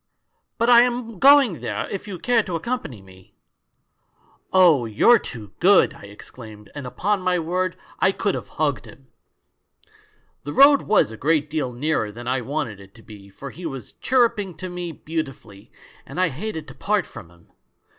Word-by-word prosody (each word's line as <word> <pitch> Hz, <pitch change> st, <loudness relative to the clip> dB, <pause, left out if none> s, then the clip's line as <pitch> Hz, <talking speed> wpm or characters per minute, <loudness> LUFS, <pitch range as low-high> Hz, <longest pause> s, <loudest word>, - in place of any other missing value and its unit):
But 235 Hz, -, +1 dB
I 240 Hz, -1 st, +8 dB
am 240 Hz, -4 st, -2 dB
going 275 Hz, -, +5 dB
there; -, -, -3 dB
if 200 Hz, +1 st, -5 dB
you 195 Hz, -3 st, -6 dB
care 240 Hz, +5 st, +2 dB
to 180 Hz, -5 st, -5 dB
accompany 160 Hz, -, -4 dB
me 95 Hz, -1 st, -19 dB, 0.3 s
' -, -, -50 dB
" -, -, -37 dB
'Oh, 170 Hz, -9 st, +5 dB
you're 220 Hz, -, +5 dB
too 105 Hz, -5 st, -9 dB
good!' 190 Hz, +2 st, +5 dB
I -, -, -13 dB
exclaimed, 105 Hz, +1 st, -12 dB
and 145 Hz, -3 st, -7 dB
upon 200 Hz, +9 st, -1 dB
my 185 Hz, -1 st, +1 dB
word 180 Hz, +2 st, -2 dB, 0.2 s
I 190 Hz, -, +3 dB
could 200 Hz, 0 st, -1 dB
have -, -, -5 dB
hugged 145 Hz, -3 st, -1 dB
him! 135 Hz, -1 st, -16 dB, 1.3 s
"The 145 Hz, -, -6 dB
road 280 Hz, 0 st, +6 dB
was 210 Hz, -, +2 dB
a 110 Hz, -, -9 dB
great 150 Hz, +3 st, 0 dB
deal 150 Hz, -5 st, -2 dB
nearer 120 Hz, -4 st, -1 dB
than 120 Hz, +3 st, -10 dB
I 130 Hz, 0 st, 0 dB
wanted 130 Hz, -5 st, -4 dB
it 100 Hz, +1 st, -16 dB
to 115 Hz, -, -16 dB
be, 100 Hz, -2 st, -14 dB
for 135 Hz, +8 st, -10 dB
he 175 Hz, 0 st, -7 dB
was 135 Hz, -7 st, -8 dB
chirruping 225 Hz, -8 st, +1 dB
to 185 Hz, +1 st, -6 dB
me 175 Hz, -1 st, -5 dB
beautifully, 135 Hz, -11 st, -7 dB, 0.3 s
and -, -, -8 dB
I 185 Hz, -2 st, +3 dB
hated 160 Hz, +2 st, -6 dB
to -, -, -10 dB
part 205 Hz, -4 st, -1 dB
from 105 Hz, -8 st, -12 dB
him. 85 Hz, -1 st, -24 dB
160 Hz, 185 wpm, -22 LUFS, 120-200 Hz, 1.3 s, I